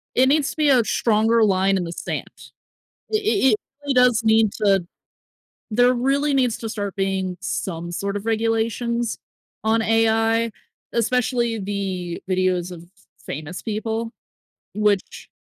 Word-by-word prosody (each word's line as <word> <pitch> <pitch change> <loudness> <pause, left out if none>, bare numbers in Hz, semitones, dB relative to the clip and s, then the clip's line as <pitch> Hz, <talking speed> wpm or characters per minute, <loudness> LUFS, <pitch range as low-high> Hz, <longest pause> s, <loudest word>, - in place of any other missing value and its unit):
It 260 +1 +5
needs 295 0 +2
to - - -12
be 300 -2 +3
a 250 -4 +5
stronger 225 +1 +2
line 195 -1 +3
in 180 - -1
the 170 - -5
sand. - - -6 0.6
It 430 -1 +1
it 400 -9 +3
it - - +3 0.3
really 280 -2 0
does 250 -2 +4
need 220 -1 +4
to 195 -4 +2 0.9
there 245 +3 +4
really 275 +3 +1
needs 250 -4 +2
to 225 - -5
start 205 -3 -4
being 190 -1 -1
some 170 -2 -4
sort 200 +3 -3
of 205 - -5
regulations 225 +1 0 0.5
on 225 +1 +2
AI, 225 +1 +2 0.4
especially 235 -1 0
the 190 -3 -4
videos 185 -1 +1
of 170 -1 -10 0.4
famous 155 +5 -6
people, 225 +1 -3 0.6
which 210 -2 0
220 Hz, 140 wpm, -22 LUFS, 195-235 Hz, 0.9 s, It